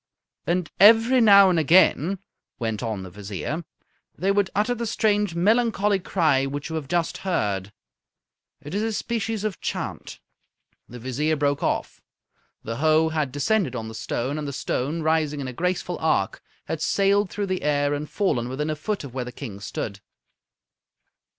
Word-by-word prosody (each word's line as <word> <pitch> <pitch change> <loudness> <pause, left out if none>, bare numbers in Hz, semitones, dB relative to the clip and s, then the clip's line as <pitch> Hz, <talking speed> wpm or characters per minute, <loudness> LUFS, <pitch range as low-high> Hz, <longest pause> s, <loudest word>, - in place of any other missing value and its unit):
"And 175 -1 0
every 225 +5 +7
now 200 -3 +8
and 170 - +2
again," 175 +2 +4 0.4
went 110 -3 -3
on 110 -5 -3
the 95 - -9
Vizier, 105 - -5 0.5
"they 195 +2 +1
would 200 -1 +2
utter 215 +4 +2
the 235 -1 -3
strange 210 -4 +1
melancholy 210 +1 +2
cry 155 -8 +1
which 145 +2 -5
you - - -3
have 155 -4 -4
just 170 +1 -1
heard. 105 - -1 0.9
It 145 - -8
is 205 - 0
a 225 0 -1
species 225 -1 -2
of 215 -5 -3
chant." - - -5 0.7
The 125 - -9
Vizier 130 +6 -1
broke 145 -1 0
off. - - -2 0.6
The 115 +1 -4
hoe 155 +2 +3
had 155 -4 -1
descended 145 - 0
on 110 -2 -4
the - - -9
stone, 125 +6 -3
and 150 - -4
the 140 - -4
stone, 145 +5 -2
rising 155 -2 +1
in 135 - -4
a 130 - -5
graceful 180 +3 -2
arc, 100 -12 0 0.2
had 160 - -4
sailed 200 +4 +2
through 205 +2 -3
the 185 -1 -2
air 145 0 +1
and 145 +1 -4
fallen 125 - 0
within 150 +4 -2
a - - -2
foot 200 +6 -3
of 135 -4 -9
where 130 -1 -3
the 125 - -7
King 115 -6 -8
stood. 100 0 -5
155 Hz, 170 wpm, -24 LUFS, 130-200 Hz, 0.9 s, now